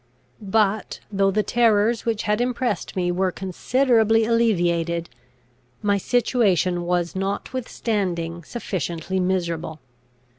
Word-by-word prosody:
But 210 +1 0
though 195 -1 +2
the 210 +2 +1
terrors 230 0 +2
which 225 -2 0
had 210 +2 +1
impressed 245 -5 -2
me 175 -1 0
were 185 +1 0
considerably 225 +4 +2
alleviated, 175 - +1 0.7
my 200 -1 +2
situation 195 -7 +1
was 175 -1 0
notwithstanding 195 -4 -2
sufficiently 185 -3 -3
miserable. 170 -4 -2
195 Hz, 100 wpm, -23 LUFS, 175-225 Hz, 0.7 s, though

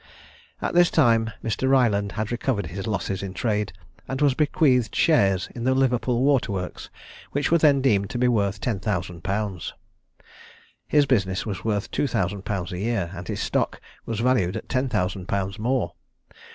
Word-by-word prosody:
At - - -1
this 175 0 +5
time 115 -7 +3
Mr. 115 +4 0
Ryland 105 -7 +3
had 110 +1 -3
recovered 120 -4 -1
his 95 +6 -6
losses 100 -3 -2
in 95 -1 -6
trade, 105 -1 -1 0.4
and 130 +1 -3
was 145 -2 +4
bequeathed 140 -5 +2
shares 100 - +3
in 120 - -6
the 130 +1 +2
Liverpool 125 -1 +1
Water 135 -6 +2
Works, 90 -2 -5 0.4
which 145 +2 0
were 170 - +5
then 145 -3 +4
deemed 100 -6 +2
to 120 - -4
be 125 +1 +3
worth 100 -4 +1
ten 110 -4 -2
thousand 90 -4 -3
pounds: 100 -3 -3 1.1
his 150 -1 +4
business 95 -8 +1
was 100 -5 -4
worth 105 -3 -1
two 145 - 0
thousand 100 -4 -2
pounds 95 -2 -3
a 90 - -4
year, 100 -5 -1
and 90 -2 -8
his - - -3
stock - - -1 0.3
was 115 -1 -2
valued 115 -8 +2
at - - -8
ten 130 0 0
thousand 90 -2 -1
pounds 100 +1 -2
more. 125 +3 0
110 Hz, 180 wpm, -24 LUFS, 95-130 Hz, 1.1 s, this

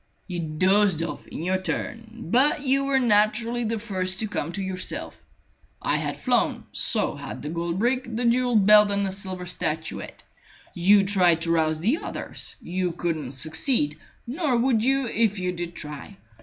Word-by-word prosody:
"You 180 -2 -5
dozed 185 +2 +2
off 165 - -6
in - - -7
your 185 +1 0
turn, 230 +4 -5
but 280 +4 +3
you 275 0 +2
were 275 -1 +2
naturally 230 +1 +2
the 225 +1 -1
first 190 -3 -1
to 220 - -1
come 165 -6 -3
to 195 - -4
yourself. 185 - -3 0.6
I - - 0
had - - -3
flown; - - 0
so - - +2
had - - -8
the 150 - -4
gold 170 +1 -3
brick, 250 +4 0
the 240 +2 -1
jewelled 240 -3 +3
belt, 210 0 +7
and 200 0 0
the 190 - -2
silver 185 -1 -6
statuette. 160 -3 -3 0.5
You 195 +3 +5
tried 180 -4 +3
to 165 0 +1
rouse 160 -1 +1
the 230 - +2
others. - - -5
You 180 0 -2
couldn't 160 -6 -3
succeed; 155 - 0 0.3
nor 270 0 -1
would 235 -2 +2
you 270 +1 +2
if 225 -3 +1
you 180 -1 -2
did 175 -1 -6
try. 150 - -8
195 Hz, 170 wpm, -24 LUFS, 170-230 Hz, 0.6 s, belt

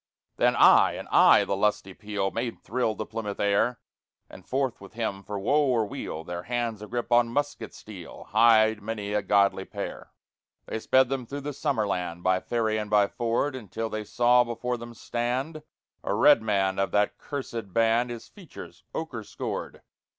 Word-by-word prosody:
_ - - -48
Then - - +3
I! - - +6
and - - -7
I! - - +6
the 100 - -1
lusty 100 -1 0
peal 100 -1 -3
Made 115 0 -4
thrill 115 -1 -1
the 110 - -4
Plymouth 105 -2 -5
air; 100 +4 +1 0.5
And 95 - -12
forth 130 -4 -1
with 100 - -12
him 110 -4 -3
for 105 +1 -6
woe 140 +9 +2
or 120 -4 +2
weal, 80 -5 -6
Their 85 +1 -5
hands 115 0 -3
agrip 120 +3 -4
on 120 0 +4
musket 145 +4 -2
steel, 95 -6 -11
Hied 110 -1 +5
many 105 -1 -4
a 105 - +1
godly 100 -2 +2
pair. - - -7 0.5
They 110 - -4
sped 130 +3 +3
them 135 -3 -3
through 140 +3 -5
the 145 +1 -5
summer 130 -5 0
land 90 -3 -3
By 95 0 +2
ferry 110 -1 -1
and 105 -1 -5
by 105 -1 +4
ford, 120 +5 -1
Until 115 -1 -5
they 110 0 -3
saw 120 +4 +4
before 120 +1 -3
them 120 0 -10
stand 125 +8 -3 0.4
A 100 - -1
redman 105 -6 +3
of 95 - +1
that 105 0 +1
cursèd 120 -8 -6
band, 115 +3 +2
His 120 -1 -7
features 190 -6 -12
ochre 130 -9 -4
scored. - - -6
115 Hz, 180 wpm, -26 LUFS, 100-120 Hz, 0.5 s, I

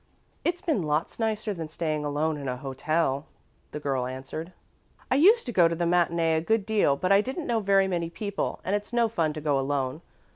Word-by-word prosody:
"It's 345 +1 -1
been 310 - 0
lots 155 +5 -1
nicer 215 -1 -1
than 165 -4 -6
staying 155 -2 -2
alone 150 +2 0
in 140 -2 -6
a 125 0 -2
hotel," 140 +2 -1 0.4
the 150 - -5
girl 135 -4 -1
answered. 135 +6 -6 0.6
"I - - +4
used 415 - +5
to - - -3
go 175 -4 +6
to 165 - -1
the 170 +1 -1
matinee 170 -1 +2
a - - 0
good 220 +4 +1
deal, 210 -10 +3
but 185 +6 -1
I 195 +1 +6
didn't 265 +8 -4
know 235 -2 +1
very 195 -2 +3
many 170 -3 -1
people 200 +3 -3
and 195 - 0
it's 205 +1 -4
no 235 -1 +3
fun 165 -8 0
to 155 - -6
go 145 -2 +1
alone. 135 +1 -1
170 Hz, 215 wpm, -27 LUFS, 150-205 Hz, 0.6 s, go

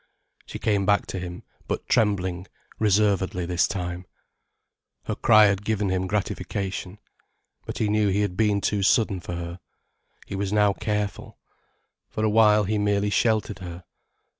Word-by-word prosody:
She - - -6
came 100 -2 +1
back 100 0 +3
to 95 - -3
him, 90 -1 -7 0.2
but - - -3
trembling, 95 -4 +1 0.3
reservedly 100 -4 +1
this 90 0 +1
time. 90 -2 -5 1.0
Her - - -3
cry 110 0 +6
had 100 0 +1
given 105 -2 -1
him 95 0 -1
gratification. 100 -1 -3 0.7
But - - -5
he 110 - 0
knew 105 0 +2
he 100 +1 +1
had 100 -3 -1
been 105 0 +2
too 105 0 0
sudden 100 -1 +2
for 85 0 -6
her. 85 +1 -6 0.7
He - - -6
was 100 0 -2
now 105 -1 +3
careful. 105 -1 -3 0.7
For 110 - -3
a 110 - +2
while 105 -1 +5
he 105 +2 -1
merely 105 0 +1
sheltered 110 -2 +1
her. 90 -1 -8
100 Hz, 155 wpm, -25 LUFS, 95-105 Hz, 1.0 s, cry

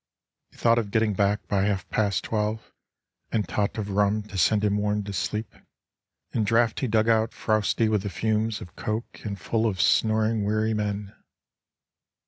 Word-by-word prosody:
He - - -23
thought 115 0 +4
of 105 -3 -3
getting 110 0 +1
back 100 +1 0
by 100 -2 +1
half 100 -3 -1
past 100 -2 +1
twelve, 110 0 -2 0.6
And 105 -3 0
tot 105 +1 -1
of 105 -2 -3
rum 105 +1 +2
to 105 -1 -8
send 105 +4 +3
him 105 -1 +2
warm 105 0 0
to 100 0 -6
sleep 105 +2 -3 0.8
In 110 - 0
draughty 115 +4 +2
dug 110 0 +2
out 110 0 +2
frowsty 110 +1 +1
with 105 -2 +1
the 100 - -4
fumes 110 +3 -1
Of 90 +1 -11
coke, 110 +1 -4
and 100 -2 -5
full 115 +4 0
of 95 -4 -2
snoring 110 +1 +2
weary 110 +2 +1
men. 105 -1 -3
105 Hz, 170 wpm, -26 LUFS, 100-110 Hz, 0.8 s, thought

